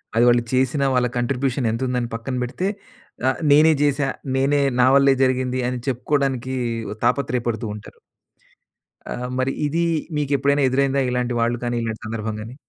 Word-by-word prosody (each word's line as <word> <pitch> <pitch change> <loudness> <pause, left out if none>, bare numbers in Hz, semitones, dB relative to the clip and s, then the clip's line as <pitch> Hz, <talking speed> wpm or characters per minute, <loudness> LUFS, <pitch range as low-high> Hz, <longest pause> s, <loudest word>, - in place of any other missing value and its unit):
అది 115 - +4
వాళ్ళు 120 0 +4
చేసినా, 130 +2 +1
వాళ్ళ 125 -1 +2
కాంట్రిబ్యూషన్ 125 +1 -1
ఎంతుందని 125 0 -1
పక్కన 115 +3 -4
పెడితే. 155 +10 -3 0.6
ఆహ్, 130 - -2
నేనే 155 +2 +6
చేశా, 140 -1 +1 0.3
నేనే 140 +2 +2 0.2
నా 130 - +5
వల్లే 140 0 +5
జరిగింది 130 0 0
అని 125 - -3
చెప్పుకోవడానికి 130 0 -1 0.5
తాపత్రేయ 125 -1 0
పడుతూ 115 -1 -2
ఉంటారు. 105 - -12 1.1
ఆహ్, 125 0 -4
మరి 130 +1 0
ఇది 165 +4 0 0.3
మీకెప్పుడైనా 140 0 +1
ఎదురైందా 135 +1 +1
ఇలాంటి 125 0 -1
వాళ్ళు 120 +1 +1
కానీ? 120 0 -1
ఇలాంటి 110 -1 -4
సందర్భం 110 -1 -4
గాని? 110 +3 -8
130 Hz, 145 wpm, -22 LUFS, 120-140 Hz, 1.1 s, నేనే